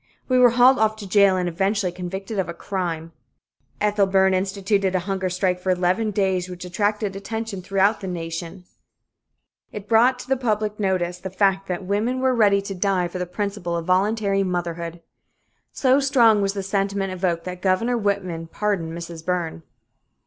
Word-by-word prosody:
We 255 -1 +3
were 250 -1 +7
hauled 250 +2 +5
off 215 0 +2
to 210 -2 -9
jail 200 -1 +4
and 180 -1 -1
eventually 195 +2 0
convicted 190 +4 -5
of 180 -3 -1
a 170 - -5
"crime." 170 -4 -4 0.7
Ethel 205 -1 +2
Byrne 190 0 +3
instituted 195 0 0
a 185 - +1
hunger 190 -1 -1
strike 180 0 0
for 185 - -4
eleven 185 +4 +1
days, 190 -3 0
which 180 0 -8
attracted 205 +2 -1
attention 220 0 -5
throughout 195 +3 +1
the 195 - -6
nation. 170 +1 -5 1.1
It 210 -1 -8
brought 235 +3 +4
to 260 +2 -1
public 215 -4 -1
notice 180 -3 -1
the 190 - -6
fact 195 0 +1
that 180 +1 -3
women 215 +7 0
were 260 0 +2
ready 200 -4 +3
to 200 - -5
die 185 -1 0
for 180 - -6
the 180 - -3
principle 195 -2 -3
of 165 - -4
voluntary 195 +2 +1
motherhood. 170 -2 -3 0.7
So 265 0 +3
strong 240 -6 +4
was 195 0 0
the 200 -1 -4
sentiment 195 0 -1
evoked 175 -2 -1
that 180 0 -7
Governor 200 +6 +1
Whitman 195 -6 -2
pardoned 170 -4 -2
Mrs. 170 -1 -8
Byrne. 170 -2 -2
195 Hz, 170 wpm, -23 LUFS, 180-210 Hz, 1.1 s, were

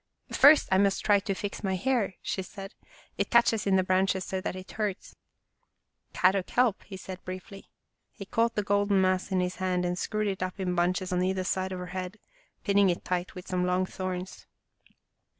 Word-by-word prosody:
" - - -54
First 290 +2 +7
I 190 - +4
must 200 -1 +1
try 205 -1 +5
to 195 0 -3
fix 205 +2 -5
my 190 -1 0
hair," 215 -1 0
she 190 - -2
said. 195 +1 -9 0.2
" - - -27
It - - 0
catches 225 -3 +3
in 195 - +4
the 185 - +3
branches 185 0 +1
so 190 -1 -3
that 185 - -3
it 185 0 -9
hurts." 210 -3 -4 0.5
" - - -48
Kadok 185 0 +2
help," 245 -5 +2
he 195 - -8
said 185 0 -9
briefly. 185 +2 -9 0.4
He 200 - -9
caught 230 +3 0
the 210 - 0
golden 200 0 +2
mass 185 +1 +1
in 185 -1 +2
his 180 0 -2
hand 185 -1 0
and 180 0 -2
screwed 215 -1 -1
it 195 -2 -2
up 185 +1 -3
in 185 -1 -1
bunches 180 +1 0
on 180 - +1
either 185 0 0
side 190 +1 -1
of 185 - -4
her 180 - -5
head, 185 +2 -5 0.5
pinning 200 -2 +4
it 175 - -2
tight 180 0 -2
with 180 - -9
some 180 -1 -1
long 180 +1 +1
thorns. 185 0 -6
190 Hz, 210 wpm, -28 LUFS, 185-200 Hz, 0.5 s, First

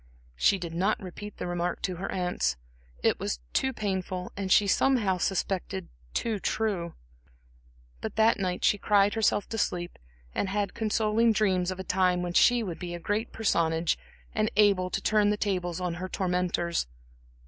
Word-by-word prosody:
She 195 - +3
did 170 -3 -6
not 190 +5 +1
repeat 205 +2 -8
the - - -4
remark 175 0 -2
to 185 -2 -2
her 195 +3 -4
aunts 180 - 0 0.5
it - - +2
was - - -2
too 265 - +2
painful 190 -5 -3
and 195 -1 -3
she 205 - +6
somehow 200 -3 +2
suspected 180 - -2 0.3
too 220 -3 0
true; 190 -6 -1 1.1
but - - -5
that 220 0 +4
night 180 -2 -1
she 205 - +3
cried 205 0 +3
herself 215 -2 +1
to 225 - -3
sleep 175 -2 -2 0.3
and 195 - -1
had 200 0 -1
consoling 220 +1 +2
dreams 190 -4 +2
of 185 0 -4
a - - -3
time 180 -1 +2
when 175 -1 -3
she 245 +6 +5
should 180 -5 -5
be 175 -1 -5
a - - -6
great 210 +6 -2
personage, 165 -6 +1 0.4
and 215 0 +1
able 200 -3 +4
to - - -2
turn 210 -1 +3
the 210 - +1
tables 180 -5 -1
on 180 -2 -2
her 185 - -4
tormentors. 180 - 0
190 Hz, 170 wpm, -28 LUFS, 180-210 Hz, 1.1 s, she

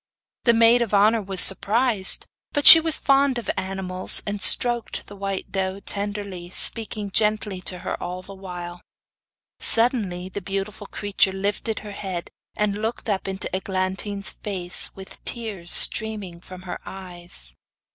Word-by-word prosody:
The 235 -2 +3
maid 230 +1 +4
of 220 -3 -2
honour 215 +3 +2
was 195 -2 +3
surprised; 210 +1 +4 0.3
but 290 -1 -2
she 325 - +12
was 320 -1 +3
fond 275 -1 +1
of 240 - -4
animals, 190 -1 +1
and 205 -1 -5
stroked 240 -2 +3
the 205 - -14
white 195 -1 -6
doe 190 0 -4
tenderly, 200 -3 -5
speaking 210 +1 +3
gently 210 -2 -1
to 180 0 -4
her - - -5
all 180 +1 -7
the 195 - -12
while. 180 -2 -10 0.8
Suddenly 210 -7 -1
the 200 - -8
beautiful 195 +2 -6
creature 200 -2 -1
lifted 205 +3 -4
her 210 -1 -10
head, 190 -4 -7 0.3
and 210 0 -2
looked 225 0 -4
up 195 -1 -4
into 190 -1 -6
Eglantine's 190 +2 -4
face, 180 -4 -2
with 190 0 -13
tears 205 -7 -6
streaming 205 -6 +3
from 185 0 -13
her 180 -2 -8
eyes. 175 - -4
200 Hz, 145 wpm, -21 LUFS, 185-215 Hz, 0.8 s, she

